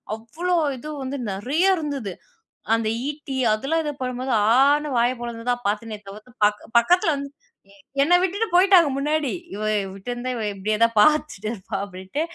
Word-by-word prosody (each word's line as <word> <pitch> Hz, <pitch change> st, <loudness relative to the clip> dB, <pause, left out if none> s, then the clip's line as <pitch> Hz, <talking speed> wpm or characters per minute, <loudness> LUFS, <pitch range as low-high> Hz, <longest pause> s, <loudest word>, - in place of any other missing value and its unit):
அவ்ளோ 335 Hz, +11 st, -2 dB, 0.2 s
இது 300 Hz, +5 st, -8 dB
வந்து 270 Hz, +1 st, -4 dB
நிறையா 295 Hz, -, +1 dB
இருந்தது. 275 Hz, -, -4 dB, 0.6 s
அந்த 225 Hz, -1 st, -1 dB, 0.2 s
ஈட்டி, 285 Hz, -3 st, -6 dB, 0.2 s
அதெல்லாம் 315 Hz, +9 st, -1 dB
இது 295 Hz, -, -2 dB
பண்ணும்போது 255 Hz, 0 st, -2 dB, 0.3 s
ஆனு 295 Hz, +2 st, +3 dB
வாய 240 Hz, +1 st, +3 dB
பொளந்துதான் 240 Hz, 0 st, -3 dB
பார்த்தனே 215 Hz, +1 st, -2 dB
தவிர்த்து, 210 Hz, +5 st, -11 dB
பக் 210 Hz, 0 st, 0 dB, 0.2 s
பக்கத்தில 335 Hz, +5 st, +3 dB
வந்து 280 Hz, 0 st, -5 dB, 0.7 s
என்ன 345 Hz, +5 st, +2 dB
விட்டுட்டு 400 Hz, +5 st, 0 dB
போயிட்டாங்க, 360 Hz, -4 st, +6 dB
முன்னாடி. 300 Hz, -1 st, 0 dB, 0.2 s
"இவ 210 Hz, -, -6 dB, 0.3 s
விட்டுருந்தா, 245 Hz, +5 st, -5 dB
இவ 225 Hz, -, -3 dB
இப்பிடியே 210 Hz, +2 st, -1 dB
தான் 230 Hz, 0 st, +3 dB
பார்த்துட்டிருப்பா." 220 Hz, -8 st, 0 dB
அப்பிடின்ட்டு. 190 Hz, +9 st, -5 dB
255 Hz, 140 wpm, -23 LUFS, 220-305 Hz, 0.7 s, போயிட்டாங்க